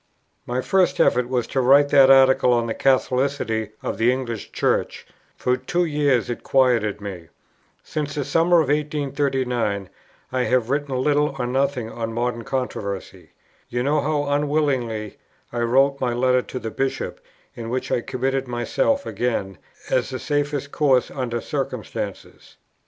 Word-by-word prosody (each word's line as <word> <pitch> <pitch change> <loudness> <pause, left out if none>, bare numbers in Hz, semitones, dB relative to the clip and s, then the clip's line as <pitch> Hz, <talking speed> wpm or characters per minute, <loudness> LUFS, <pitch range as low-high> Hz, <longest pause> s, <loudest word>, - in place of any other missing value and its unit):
"My 125 +1 -1
first 185 +4 +2
effort 125 0 +3
was 125 -2 0
to 135 - -1
write 140 +3 +5
that 135 -2 +6
article 130 -2 +6
on 120 -1 +1
the 115 - -2
Catholicity 130 -4 +1
of - - -3
the 115 +2 +4
English 125 -4 -4
Church; - - -1 0.3
for 125 - +1
two 175 +8 -1
years 145 - +1
it 120 - -4
quieted 115 -6 +2
me. 95 -5 -7 0.6
Since 145 -1 -4
the 145 -2 -2
summer 170 +3 +4
of 145 - -2
1839 135 -8 -1 0.4
I 130 -1 0
have 125 -1 +1
written 145 -1 -1
little 145 +2 +1
or 125 - -1
nothing 130 -2 -1
on 115 -1 -4
modern 120 0 -2
controversy.... 105 -7 -5 0.4
You 120 0 -1
know 145 +2 +2
how 150 0 0
unwillingly 140 -7 -1 0.3
I 120 - -2
wrote 135 +4 +2
my 125 -2 0
letter 125 +1 +2
to 130 - -7
the 110 -2 -5
Bishop 135 +3 -3 0.3
in 115 -1 -7
which 130 +1 -3
I - - +1
committed 135 +1 -2
myself 125 - 0
again, 95 -8 -2 0.3
as 130 - +1
the 130 - -4
safest 145 0 -2
course 135 -4 +2
under 120 -3 -3
circumstances. - - -5
130 Hz, 150 wpm, -22 LUFS, 120-140 Hz, 0.6 s, that